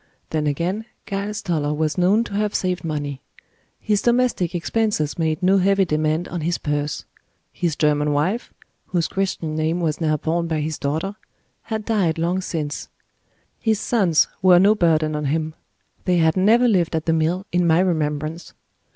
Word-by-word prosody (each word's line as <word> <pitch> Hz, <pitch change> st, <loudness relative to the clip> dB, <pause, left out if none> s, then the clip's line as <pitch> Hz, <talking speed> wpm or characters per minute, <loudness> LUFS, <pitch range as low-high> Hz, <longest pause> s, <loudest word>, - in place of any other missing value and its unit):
Then 155 Hz, -1 st, 0 dB
again, 175 Hz, +9 st, -1 dB, 0.2 s
Giles 205 Hz, +1 st, -3 dB
Toller 150 Hz, -4 st, -1 dB
was 155 Hz, 0 st, 0 dB
known 190 Hz, +5 st, +3 dB
to 220 Hz, -, -9 dB
have 210 Hz, 0 st, -1 dB
saved 185 Hz, -1 st, -1 dB
money. 145 Hz, -4 st, -4 dB, 0.6 s
His 210 Hz, -2 st, 0 dB
domestic 240 Hz, -8 st, +1 dB
expenses 175 Hz, -4 st, -1 dB
made 160 Hz, +2 st, 0 dB
no 190 Hz, +2 st, +4 dB
heavy 195 Hz, +1 st, +3 dB
demand 155 Hz, +1 st, 0 dB
on 175 Hz, -1 st, -4 dB
his 170 Hz, +2 st, 0 dB
purse; 145 Hz, 0 st, -2 dB, 0.5 s
his 170 Hz, -4 st, -1 dB
German 150 Hz, 0 st, +2 dB
wife 175 Hz, +11 st, -1 dB, 0.4 s
(whose 170 Hz, -3 st, 0 dB
Christian 185 Hz, -5 st, -2 dB
name 160 Hz, +2 st, 0 dB
was 160 Hz, -1 st, -1 dB
now 155 Hz, -1 st, +2 dB
borne 170 Hz, +3 st, -1 dB
by 160 Hz, -2 st, -1 dB
his 155 Hz, 0 st, -3 dB
daughter) 160 Hz, +9 st, -2 dB, 0.5 s
had 220 Hz, -2 st, -3 dB
died 190 Hz, -8 st, +1 dB
long 175 Hz, +3 st, 0 dB
since; 155 Hz, -5 st, -4 dB, 0.7 s
his 220 Hz, -3 st, +1 dB
sons 195 Hz, -10 st, +2 dB
were 185 Hz, -1 st, +7 dB
no 200 Hz, +4 st, +6 dB
burden 160 Hz, -5 st, +2 dB
on 150 Hz, 0 st, -2 dB
him; 155 Hz, +2 st, -1 dB, 0.5 s
they 180 Hz, -1 st, +2 dB
had 160 Hz, -1 st, +3 dB
never 225 Hz, +6 st, +4 dB
lived 180 Hz, -7 st, +2 dB
at 160 Hz, -, -2 dB
the 165 Hz, -, +2 dB
mill 165 Hz, +4 st, 0 dB
in 175 Hz, 0 st, +2 dB
my 160 Hz, +1 st, +4 dB
remembrance. 155 Hz, -2 st, -1 dB
170 Hz, 170 wpm, -22 LUFS, 155-195 Hz, 0.7 s, were